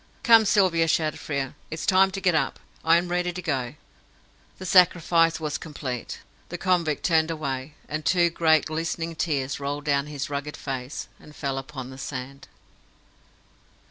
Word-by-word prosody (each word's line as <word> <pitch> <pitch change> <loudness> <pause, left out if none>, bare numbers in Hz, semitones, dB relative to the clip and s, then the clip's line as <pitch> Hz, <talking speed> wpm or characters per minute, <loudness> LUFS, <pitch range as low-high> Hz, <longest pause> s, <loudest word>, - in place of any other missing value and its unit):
"Come, 225 -2 +7
Sylvia!" 185 -6 +3
shouted 155 -1 +1
Frere. 140 -3 -3 0.2
"It's 160 - -5
time 190 0 +5
to 195 +1 -5
get 185 -2 +2
up. 150 -4 0 0.2
I 165 +1 +5
am 175 +1 -1
ready 180 0 0
to 180 - -6
go!" 135 -7 -2 0.8
The 185 - -8
sacrifice 170 -2 +4
was 150 -2 -3
complete. 130 -6 -6 0.3
The 175 - -5
convict 175 -5 0
turned 160 -2 +3
away, 140 -3 -4
and 155 +1 -4
two 175 +1 +3
great 160 -2 +3
glistening 165 +1 -3
tears 140 -5 -1
rolled 145 +1 -4
down 140 -1 +1
his 150 -1 -4
rugged 145 +1 -4
face, 135 0 -5
and 150 - -15
fell 135 -2 -2
upon 135 -2 -8
the 130 - -11
sand. 135 0 -7
155 Hz, 160 wpm, -25 LUFS, 140-170 Hz, 0.8 s, Come